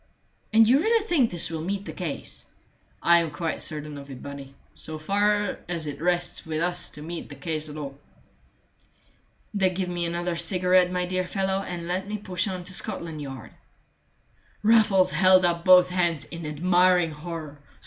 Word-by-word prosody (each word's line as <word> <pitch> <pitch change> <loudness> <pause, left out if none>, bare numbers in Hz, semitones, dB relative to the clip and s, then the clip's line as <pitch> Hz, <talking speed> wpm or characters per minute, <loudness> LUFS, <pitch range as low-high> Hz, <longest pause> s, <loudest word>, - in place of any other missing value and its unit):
"And 220 0 +6
you 260 +4 +5
really 445 +4 +2
think 300 - +3
this 165 -2 0
will 160 -1 -3
meet 195 +4 -3
the - - -6
case?" 170 -6 -5 0.6
"I 170 0 +6
am 165 -1 -1
quite 155 +2 -3
certain 150 -1 -5
of 140 0 -12
it, 130 -2 -9
Bunny, 140 -1 -9 0.2
so 155 0 -4
far 205 +4 +1
as 170 -3 -2
it 145 0 -6
rests 175 0 +1
wit 155 -1 -3
us 175 +1 0
to 150 - -8
meet 170 +1 -6
the 145 - -9
case 155 +2 -3
at 150 - -8
all." 140 -2 -7 1.5
"Then 190 -3 +1
give 185 -1 -2
me 175 -1 -2
another 175 +1 -2
cigarette, 180 +1 +3
my 180 0 -1
dear 185 0 -2
fellow, 190 0 -1
and 175 -3 -6
let 185 +2 -2
me 210 +1 -3
push 185 -2 -1
on 185 -2 -4
to 185 +2 -3
Scotland 165 -3 -2
Yard." 135 -4 -8 1.1
Raffles 210 -4 +4
held 185 0 +5
up 170 -1 0
both 180 0 +7
hands 175 -4 0
in 170 -2 -7
admiring 175 +2 +3
horror. 155 -1 -7
175 Hz, 180 wpm, -25 LUFS, 155-185 Hz, 1.5 s, both